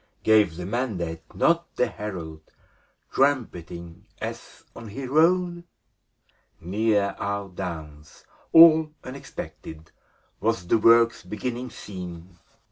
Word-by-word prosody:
Gave 105 Hz, -6 st, +4 dB
the 90 Hz, +1 st, -6 dB
mandate 95 Hz, -7 st, -3 dB
not 170 Hz, 0 st, +1 dB
the 125 Hz, -, +2 dB
herald. 85 Hz, -9 st, -7 dB, 0.7 s
Trumpeting, 85 Hz, -, -1 dB
as -, -, -7 dB
on 115 Hz, -, -9 dB
he 130 Hz, +6 st, -6 dB
rode? 175 Hz, +5 st, +2 dB, 1.0 s
Near 100 Hz, +2 st, 0 dB
our 100 Hz, 0 st, -3 dB
downs, 80 Hz, -5 st, -8 dB, 0.3 s
all 160 Hz, -1 st, +8 dB
unexpected, 80 Hz, -, -9 dB, 0.5 s
Was 110 Hz, -5 st, 0 dB
the 110 Hz, +6 st, +2 dB
work's 115 Hz, +1 st, +5 dB
beginning 120 Hz, +6 st, -5 dB
seen. 90 Hz, -4 st, -9 dB
105 Hz, 100 wpm, -25 LUFS, 85-125 Hz, 1.0 s, all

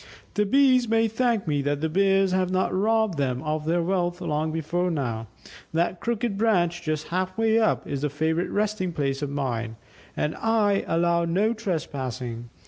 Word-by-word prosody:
"The 210 Hz, 0 st, +1 dB
Bees 255 Hz, -1 st, +4 dB
may 225 Hz, 0 st, +3 dB
thank 225 Hz, -3 st, 0 dB
me 145 Hz, -2 st, +1 dB
that 145 Hz, +1 st, -1 dB
the 160 Hz, -, 0 dB
Bears 195 Hz, +2 st, +3 dB
have 185 Hz, -1 st, +1 dB
not 185 Hz, 0 st, 0 dB
robbed 215 Hz, -3 st, +1 dB
them 130 Hz, -2 st, -1 dB
of 155 Hz, 0 st, -2 dB
their 170 Hz, +2 st, +1 dB
wealth 175 Hz, -1 st, 0 dB
long 155 Hz, -2 st, -1 dB
before 170 Hz, +3 st, -1 dB
now. 120 Hz, -8 st, -2 dB, 0.5 s
That 170 Hz, +2 st, +1 dB
crooked 230 Hz, -3 st, -2 dB
branch, 175 Hz, -6 st, +2 dB
just 155 Hz, -2 st, -3 dB
half 185 Hz, +2 st, -2 dB
way 225 Hz, 0 st, +3 dB
up, 220 Hz, -, +1 dB
is 140 Hz, 0 st, -4 dB
a 150 Hz, -, +1 dB
favourite 160 Hz, +4 st, -1 dB
resting 205 Hz, -4 st, -1 dB
place 140 Hz, -2 st, -1 dB
of 145 Hz, -, -2 dB
mine, 120 Hz, -5 st, -3 dB, 0.4 s
and 150 Hz, -, 0 dB
I 215 Hz, -3 st, +2 dB
allow 170 Hz, +1 st, +2 dB
no 200 Hz, +7 st, +1 dB
trespassing. 130 Hz, -, -4 dB
175 Hz, 175 wpm, -25 LUFS, 150-205 Hz, 0.5 s, Bees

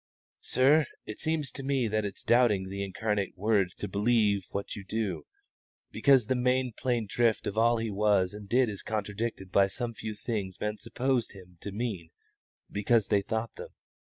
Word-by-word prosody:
"Sir, 140 Hz, +3 st, +4 dB, 0.2 s
it 105 Hz, -, -7 dB
seems 155 Hz, -4 st, -1 dB
to -, -, -6 dB
me 135 Hz, -3 st, +1 dB
that 110 Hz, 0 st, 0 dB
it's 100 Hz, -, -6 dB
doubting 110 Hz, -6 st, +3 dB
the 100 Hz, +1 st, -3 dB
incarnate 100 Hz, 0 st, -2 dB
Word 100 Hz, -2 st, +2 dB
to -, -, -4 dB
believe 105 Hz, -1 st, +2 dB
what 100 Hz, -, -4 dB
you 100 Hz, -, -7 dB
do, 95 Hz, -7 st, -3 dB, 0.6 s
because 135 Hz, -5 st, +4 dB
the 130 Hz, -, +1 dB
main 125 Hz, 0 st, +1 dB
plain 120 Hz, -4 st, 0 dB
drift 115 Hz, +2 st, +1 dB
of 100 Hz, -, -3 dB
all 115 Hz, +1 st, +4 dB
He 115 Hz, -1 st, -2 dB
was 100 Hz, -2 st, +2 dB
and 105 Hz, -1 st, -9 dB
did 125 Hz, +2 st, +4 dB
is 105 Hz, -2 st, -5 dB
contradicted 105 Hz, -2 st, -3 dB
by 100 Hz, -1 st, +5 dB
some 115 Hz, +4 st, -3 dB
few 110 Hz, -2 st, -6 dB
things 105 Hz, -4 st, -4 dB
men 105 Hz, 0 st, -2 dB
supposed 125 Hz, 0 st, -1 dB
Him 90 Hz, -3 st, -15 dB
to 100 Hz, -, -5 dB
mean 100 Hz, -6 st, -4 dB, 0.6 s
because 105 Hz, +1 st, +2 dB
they 100 Hz, -2 st, +3 dB
thought 110 Hz, +3 st, -3 dB
them. -, -, -7 dB
110 Hz, 180 wpm, -29 LUFS, 100-120 Hz, 0.6 s, by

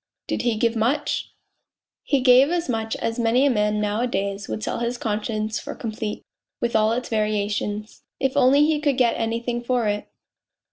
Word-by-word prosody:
" -, -, -65 dB
Did -, -, -1 dB
he 240 Hz, -2 st, +1 dB
give 230 Hz, +1 st, +1 dB
much? 250 Hz, +7 st, 0 dB, 0.3 s
" -, -, -55 dB
" -, -, -70 dB, 0.2 s
He 280 Hz, -2 st, +1 dB
gave 255 Hz, +2 st, +6 dB
as 345 Hz, 0 st, -1 dB
much 225 Hz, -3 st, -2 dB
as 230 Hz, +1 st, -3 dB
many 235 Hz, +4 st, +3 dB
a 280 Hz, -, +4 dB
man 210 Hz, -2 st, +1 dB
nowadays 205 Hz, -2 st, -1 dB
would 215 Hz, -, -4 dB
sell -, -, -2 dB
his 235 Hz, +1 st, -2 dB
conscience 215 Hz, 0 st, -2 dB
for -, -, -7 dB
complete, 220 Hz, -2 st, -5 dB, 0.4 s
with 235 Hz, -1 st, -1 dB
all 215 Hz, 0 st, +4 dB
its 245 Hz, +2 st, -2 dB
variations... 210 Hz, -1 st, -2 dB, 0.2 s
if 265 Hz, -1 st, 0 dB
only 280 Hz, +4 st, +5 dB
he 305 Hz, -1 st, +1 dB
could 290 Hz, -3 st, +1 dB
get 245 Hz, -3 st, +3 dB
anything 235 Hz, +1 st, -2 dB
for 240 Hz, -2 st, 0 dB
it. 205 Hz, 0 st, -2 dB
230 Hz, 190 wpm, -23 LUFS, 215-250 Hz, 0.4 s, gave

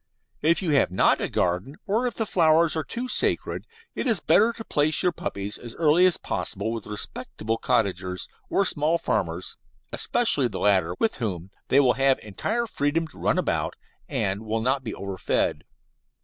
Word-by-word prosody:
If 165 Hz, +5 st, +3 dB
you 165 Hz, -, 0 dB
have 140 Hz, -, +3 dB
not 90 Hz, -, +3 dB
a -, -, -1 dB
garden, 90 Hz, +11 st, -1 dB
or 225 Hz, +5 st, +1 dB
if 245 Hz, -, -4 dB
the 225 Hz, -, -1 dB
flowers 165 Hz, -3 st, +3 dB
are 160 Hz, -, -1 dB
too 240 Hz, -, -5 dB
sacred, -, -, -1 dB, 0.3 s
it -, -, -3 dB
is 225 Hz, -6 st, +2 dB
better 205 Hz, +9 st, +4 dB
to 230 Hz, -1 st, -8 dB
place 150 Hz, +1 st, +2 dB
your 180 Hz, -, +3 dB
puppies 100 Hz, -9 st, -4 dB
as 120 Hz, -1 st, -10 dB
early 165 Hz, +3 st, +5 dB
as 180 Hz, -, +2 dB
possible 110 Hz, -, -3 dB
with 115 Hz, -1 st, -5 dB
respectable 110 Hz, +1 st, -3 dB
cottagers, 95 Hz, -6 st, 0 dB, 0.2 s
or 200 Hz, -, +2 dB
small 160 Hz, -1 st, +1 dB
farmers, 90 Hz, -, -2 dB, 0.4 s
especially 185 Hz, -, +2 dB
the 100 Hz, -5 st, -6 dB
latter, 95 Hz, -4 st, +2 dB
with 225 Hz, -, 0 dB
whom 95 Hz, -, -4 dB, 0.2 s
they 135 Hz, -, +4 dB
will 130 Hz, -3 st, +4 dB
have 135 Hz, 0 st, +3 dB
entire 220 Hz, -, -2 dB
freedom 160 Hz, -5 st, 0 dB
to -, -, -16 dB
run -, -, +1 dB
about, -, -, -1 dB, 0.3 s
and 95 Hz, +2 st, 0 dB
will 110 Hz, +1 st, -2 dB
not 130 Hz, +2 st, +1 dB
be 110 Hz, -, -5 dB
overfed. 100 Hz, -1 st, -1 dB
135 Hz, 175 wpm, -25 LUFS, 105-170 Hz, 0.4 s, early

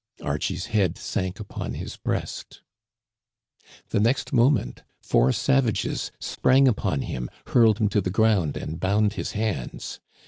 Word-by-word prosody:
Archie's 75 Hz, +5 st, -2 dB
head 95 Hz, -6 st, +2 dB
sank 95 Hz, +2 st, -3 dB
upon 105 Hz, -, -5 dB
his -, -, -6 dB
breast. -, -, -4 dB, 1.3 s
The -, -, +1 dB
next 120 Hz, +7 st, +1 dB
mo 120 Hz, +1 st, +6 dB
ment 135 Hz, -8 st, -1 dB, 0.2 s
four 65 Hz, +2 st, +3 dB
savages 135 Hz, -, 0 dB
sprang 135 Hz, +1 st, +3 dB
upon 95 Hz, -, 0 dB
him, 60 Hz, -1 st, -4 dB, 0.2 s
hurled 115 Hz, -4 st, +4 dB
him 110 Hz, -2 st, +2 dB
to 105 Hz, 0 st, +1 dB
the 90 Hz, -, -2 dB
ground, 100 Hz, -6 st, +2 dB
and 80 Hz, +2 st, -5 dB
bound 100 Hz, +2 st, +2 dB
his -, -, -4 dB
hands. 105 Hz, -, -3 dB
105 Hz, 140 wpm, -25 LUFS, 90-115 Hz, 1.3 s, mo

